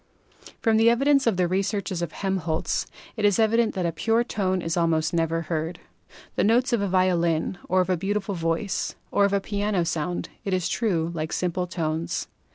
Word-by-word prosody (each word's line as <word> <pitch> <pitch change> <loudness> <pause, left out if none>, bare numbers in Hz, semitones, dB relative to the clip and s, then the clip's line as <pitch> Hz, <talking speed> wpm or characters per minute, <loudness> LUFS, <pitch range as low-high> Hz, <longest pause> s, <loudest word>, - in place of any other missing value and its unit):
From 225 -2 +4
the 225 +1 +6
evidence 275 +3 +3
of 215 -6 +2
the 180 -1 +2
researches 195 -1 -1
of 170 - -3
Helmholtz 185 -5 -1 0.3
it 220 - -4
is 205 -2 +4
evident 225 +1 +2
that 185 -2 -1
a 170 - +1
pure 225 +9 +1
tone 190 -5 -1
is 165 -1 -1
almost 165 -2 +1
never 165 0 0
heard. 165 +1 -3 0.6
The - - +2
notes 245 +4 +3
of 230 - +2
a 200 - 0
violin, 175 -2 +1
or 185 +1 +4
of 180 - -2
a 180 - +2
beautiful 200 +3 -2
voice, 165 +3 -1 0.2
or 200 - +4
of 200 - +1
a 200 - +3
piano 200 -2 -1
sound, 170 +1 -2
it 195 -2 0
is 180 -2 -1
true, 170 -8 0
like 160 -1 -3
simple 180 0 -1
tones. 165 -2 -2
185 Hz, 190 wpm, -25 LUFS, 165-205 Hz, 0.6 s, the